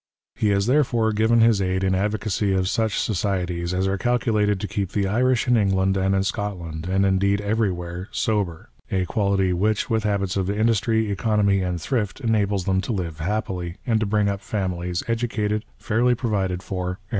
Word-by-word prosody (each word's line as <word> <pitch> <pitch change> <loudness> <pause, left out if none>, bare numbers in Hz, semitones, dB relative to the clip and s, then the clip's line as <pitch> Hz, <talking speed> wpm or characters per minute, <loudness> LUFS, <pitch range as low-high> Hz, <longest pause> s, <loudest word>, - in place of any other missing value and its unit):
He 110 - 0
has 100 0 +2
therefore 120 -4 +2
given 110 +2 +3
his 115 -3 +4
aid 95 0 0
in 95 0 +2
advocacy 105 0 0
of 95 -1 +1
such 110 -1 0
societies 90 -4 -1
as 95 +1 0
are 95 0 -1
calculated 110 -4 +1
to 105 - -3
keep 100 -2 -3
the 100 -1 +1
Irish 125 +4 +1
in 125 - +4
England 95 -3 +2
and 95 0 +1
in 95 - +2
Scotland, 90 -5 -4
and 95 +1 +2
indeed 100 +1 +2
everywhere, 95 -4 -2
sober, 105 -9 -2
— - - -30
a 95 -1 +1
quality 100 -3 +1
which, 105 +6 0
with 110 -1 +1
habits 100 -3 0
of 95 -1 -1
industry, 110 0 +1
economy, 100 -1 +2
and 90 -1 -2
thrift, 105 - -2
enables 105 -6 0
them 95 -1 +1
to 120 - -4
live 85 -7 -3
happily, 90 -1 -3
and 115 -3 +2
to 110 - -1
bring 105 0 +2
up 100 0 -2
famihes 90 -2 -3
educated, 115 -2 -1
fairly 120 +2 +1
provided 100 -7 -1
for, 90 -2 -3
and 90 - -1
PREFACE. 95 - -29
100 Hz, 190 wpm, -23 LUFS, 95-110 Hz, -, his